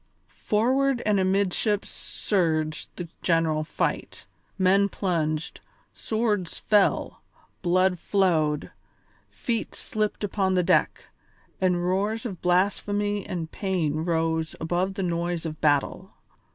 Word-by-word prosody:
Forward 255 +4 +2
and 210 -2 +3
amidships 195 +2 +1
surged 155 -6 -1
the 175 - -6
general 165 -2 +2
fight: 155 - -3 0.3
men 195 +1 +4
plunged, 160 -5 -2 0.3
swords 215 -5 -1
fell, 210 -2 +2 0.4
blood 185 0 +2
flowed, 160 -7 +1 0.6
feet 230 -2 -3
slipped 215 -1 -3
upon 190 -2 0
the 180 - +3
deck, - - +2 0.6
and 180 -2 +2
roars 205 +6 0
of 195 -8 -5
blasphemy 205 +2 +1
and 165 -3 -4
pain 175 -7 -1
rose 160 -1 0
above 175 +4 -1
the 195 - -2
noise 170 -1 -1
of 155 -1 -5
battle. 145 -2 +1
185 Hz, 110 wpm, -26 LUFS, 165-205 Hz, 0.6 s, men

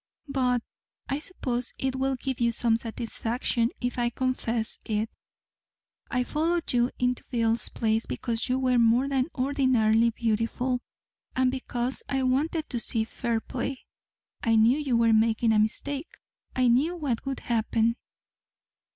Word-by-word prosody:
But 250 -3 +1 0.5
I 275 - 0
suppose 255 -8 -3
it 265 -1 -1
will 265 0 0
give 260 0 -4
you 235 -1 +3
some 230 0 +2
satisfaction 230 +1 -1
if 245 0 -2
I 240 0 +2
confess 235 -2 -1
it 215 +1 -1 1.0
I 250 0 +1
followed 325 +4 -1
you 240 0 +3
into 250 0 0
Bill's 230 -1 +1
place 220 0 0
because 235 +1 -2
you 255 - +2
were 255 -2 +2
more 235 +3 +4
than 270 -1 +1
ordinarily 250 -4 +3
beautiful, 230 +3 0 0.6
and 255 0 +3
because 255 -1 -2
I 270 -1 0
wanted 300 +5 +1
to 240 - -1
see 225 -1 +1
fair 230 0 -2
play. 255 +3 -5 0.6
I 225 -1 +2
knew 230 +6 +5
you 270 -5 +1
were 230 -1 +4
making 225 +1 +3
a 215 - +4
mistake. 275 +8 -2 0.4
I 255 -1 +3
knew 275 +9 +3
what 280 -9 -2
would 270 - -3
happen." 230 0 +1
245 Hz, 145 wpm, -27 LUFS, 230-265 Hz, 1.0 s, knew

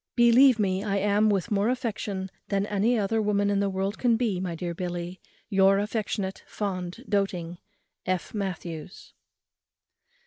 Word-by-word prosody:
"Believe 240 +1 +6
me 195 -2 0
I 200 -2 0
am, 205 +2 +3
with 200 +2 0
more 205 +2 +2
affection 210 -6 -3 0.2
than 200 0 0
any 210 +4 +1
other 220 +2 +1
woman 205 -1 +1
in 200 - +2
the 200 0 +1
world 195 +2 -2
can 235 -2 +3
be, 220 -6 0
my 180 -2 -3
dear 170 +1 -4
Billy, 175 +1 -5 0.3
Your 195 0 +4
affectionate, 205 -2 -2
fond, 190 +3 -4
doating 180 -4 -1 0.5
"F. 185 -1 -1
MATTHEWS." 180 -4 -5
200 Hz, 145 wpm, -27 LUFS, 185-215 Hz, 0.5 s, Believe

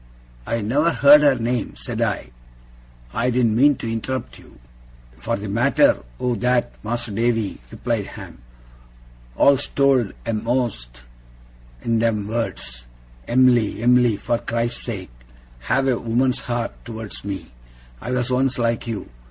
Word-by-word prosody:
'I 115 0 -1
never 140 +10 +2
heard 145 -1 +7
her 145 -2 +5
name,' 120 -1 -2
said - - -5
I. - - -1 0.8
'I 120 +2 +1
didn't 120 -3 +2
mean 140 +4 +5
to 115 -2 -5
interrupt 115 - -4
you.' - - -18 0.6
'For - - -2
the 100 +2 -6
matter 120 +7 +3 0.2
o' 125 -1 0
that, 125 0 +1
Mas'r 120 0 -3
Davy,' 115 - 0
replied - - -2
Ham, - - -11 0.9
'all's 140 - +4
told 135 -6 +2
a'most 110 - -2 0.8
in 115 -1 +1
them 110 -3 0
words, 65 - -4 0.4
"Em'ly, 120 -3 +3
Em'ly, 125 -3 +4
for 120 +3 -1
Christ's 120 +1 -2
sake, 100 - -5 0.6
have 135 +3 +2
a 125 -3 +1
woman's 125 +3 +1
heart 120 -2 -4
towards 115 -2 -7
me. 95 -7 -6 0.5
I - - -6
was 125 0 -1
once 130 0 +1
like 115 -1 -1
you!" 110 -5 -4
120 Hz, 135 wpm, -22 LUFS, 110-125 Hz, 0.9 s, heard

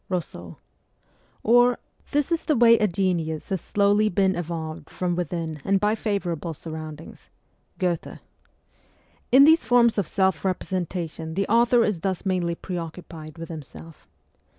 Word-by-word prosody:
(Eousseau); 155 - -5 0.9
or, 245 +2 +5 0.2
' - - -32
This 290 +2 0
is 335 -1 0
the 305 - +2
way 230 -1 +6
a 210 - +3
genius 175 -4 -1
has 190 -2 -1
slowly 205 +1 +2
been 190 0 +1
evolved 160 -2 -5
from 180 -1 -2
within 165 -3 -4
and 195 0 +2
by 210 +1 +2
favourable 180 -7 -3
surroundings 155 0 -9 0.2
' - - -43
(Goethe). 175 -4 -2 1.1
In 265 +2 +8
these 320 +3 +6
forms 235 -3 +4
of 190 - -1
self 190 -3 +1
representation 175 -4 -3
the 195 +1 0
author 235 +1 +4
is 205 -6 -1
thus 190 +1 -3
mainly 180 -3 0
pre 180 0 -5
occupied 165 -1 -9
with 165 0 -8
himself. 160 +1 -11
185 Hz, 150 wpm, -24 LUFS, 165-210 Hz, 1.1 s, In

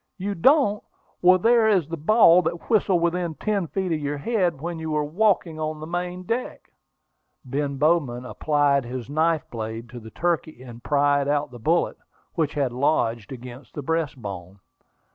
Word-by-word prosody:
"You 200 +1 -3
don't! 210 - +3 0.4
Well, 185 +1 +6
there 230 +3 +4
is 185 -8 +2
the 165 - -4
ball 175 +2 +5
that 170 +5 -4
whistled 195 -6 +3
within 170 -1 -1
ten 200 -3 -1
feet 190 +1 -2
of 160 - 0
your 145 0 -3
head 175 - 0
when 170 +2 -5
you 160 0 -5
were 150 -1 0
walking 170 0 +1
on 155 0 -3
the 155 - -6
main 180 +2 -4
deck." 230 +6 -4 0.7
Ben 140 +2 -2
Bowman 140 -5 +1
applied 145 0 +1
his 125 +1 -6
knife 160 0 +1
blade 115 0 -6
to 120 +1 -9
the 110 -1 -11
turkey, 160 -2 -2
and 120 -2 -11
pried 145 -1 +2
out 145 0 0
the 120 - -10
bullet, 165 +9 +1 0.4
which 160 -3 -1
had 140 -4 0
lodged 120 -5 0
against 125 0 -10
the 145 - -5
breastbone. 110 - -4
155 Hz, 170 wpm, -24 LUFS, 135-175 Hz, 0.7 s, Well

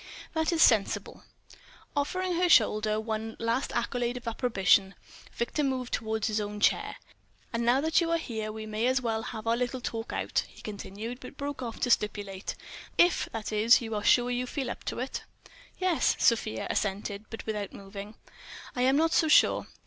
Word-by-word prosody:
"That 320 0 +1
is 335 -1 +4
sensible." 215 -4 +2 0.7
Offering 365 +6 0
her 355 0 +2
shoulder 215 -5 +4
one 220 0 -4
last 230 +4 -1
accolade 240 +1 -1
of 245 -1 -9
approbation, 195 -5 +2 0.4
Victor 235 +6 -1
moved 260 -3 -2
toward 220 -1 -1
his 215 -2 0
own 210 0 -5
chair. - - +2 0.6
"And 230 0 0
now 245 +3 +3
that 320 +3 +3
you 335 - 0
are 335 - +3
here, 220 -8 -4
we 220 0 -7
may 215 +2 -1
as 260 +1 +3
well 225 -3 -1
have 220 -1 -6
our 230 0 +2
little 250 +1 -2
talk 225 -2 -4
out," - - -1
he - - -16
continued, 215 +3 -6
but 280 - -11
broke 285 -1 -4
off 235 -3 -5
to 245 - +1
stipulate: 205 -3 -1 0.4
"If, 350 0 +4
that 220 -1 -4
is, 215 +3 +5
you 225 -2 -5
are 210 -1 -2
sure 245 +2 +4
you 250 +1 -1
feel 265 -2 -3
up - - -8
to - - -3
it?" 255 +2 -3 0.6
"Yes," 370 -3 +2
Sofia 220 - +2
assented, 200 +1 -2
but 225 - -8
without 210 -2 -3
moving. 200 +2 -9 0.6
"I 250 - -1
am 265 +2 +4
not 325 +1 +2
so 320 - +4
sure. 305 - +5
230 Hz, 185 wpm, -29 LUFS, 215-260 Hz, 0.7 s, is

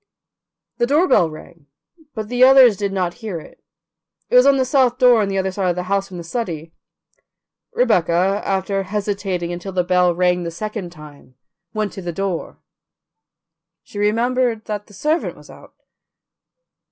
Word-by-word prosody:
The 240 - +2
doorbell 285 - +3
rang, 155 0 -13 0.5
but 215 -2 -4
the 245 +2 +2
others 260 -4 +7
did 200 0 -3
not 180 -3 -1
hear 205 -7 -4
it; - - -16 0.7
it - - +2
was 250 +2 +7
on 280 -1 +5
the 260 - +1
south 255 -2 +2
door 250 -3 +5
on 205 - 0
the 195 0 -2
other 190 0 -1
side 185 -1 -1
of 175 - 0
the 180 - -3
house 195 +1 -1
from 185 - -9
the 170 - -7
study. 165 -5 -5 1.0
Rebecca, 190 - +2
after 195 0 -1
hesitating 195 -3 -3
until 180 +2 -7
the 180 -1 +1
bell 180 -1 +2
rang 180 0 +1
the 170 - -4
second 205 +1 -6
time, 150 -5 -15 0.4
went 215 -1 -2
to 195 - -7
the 175 -1 -4
door; 185 0 -4 1.3
she 205 - -9
remembered 230 +2 0
that 210 -1 -5
the 205 - -16
servant 310 - -1
was - - -15
out. - - -16
195 Hz, 165 wpm, -20 LUFS, 180-230 Hz, 1.3 s, others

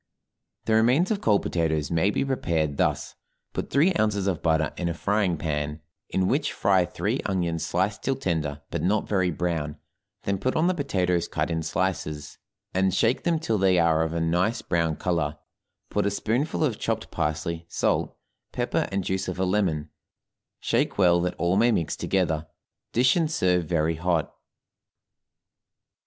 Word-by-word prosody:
The 110 - +1
remains 125 - +4
of 205 - 0
cold 105 -3 +3
potatoes 80 -3 -1
may 85 +4 +2
be 105 - 0
prepared 80 - -1
thus: - - 0 0.4
Put - - -3
three 155 +8 +3
ounces 105 -3 +1
of 95 -5 -1
butter 80 -1 +1
in 85 - -2
a 85 - -3
frying 100 -2 +1
pan 75 -1 -2 0.3
in 95 -1 +1
which 140 +6 0
fry 95 -3 +3
three - - -2
onions 85 -4 -1
sliced 95 +5 -1
till 135 - 0
tender, 75 - -2
but - - -2
not 100 +4 +1
very 95 -3 +1
brown, 80 -3 -2 0.5
then 100 -1 -1
put 130 - -1
on 160 - +2
the 185 - +3
potatoes 90 - 0
cut - - -2
in 80 0 -1
slices, 75 -3 -3 0.3
and 95 0 +2
shake 115 +3 +1
them 170 -2 +2
till 155 -10 -1
they 95 -1 +4
are 80 -2 +3
of 80 0 0
a 85 - -2
nice 90 +8 +1
brown 85 -2 0
color, 80 -2 -1 0.5
put 105 -1 +1
a - - +3
spoonful 120 +11 -1
of 125 -8 0
chopped 115 -1 -2
parsley, 80 +1 -2
salt, - - 0 0.3
pepper, - - -1
and 95 0 -1
juice 95 +1 -2
of 90 - -4
a 95 - +1
lemon, 90 -6 0 0.7
shake - - 0
well 85 -3 +4
that 90 0 -1
all 85 +3 +1
may 120 +3 +4
mix 85 -8 0
together, 80 -5 0 0.4
dish, 130 +3 +4
and 165 -3 +1
serve 90 - +1
very 80 -1 0
hot. 85 -1 0
90 Hz, 170 wpm, -26 LUFS, 80-105 Hz, 0.7 s, remains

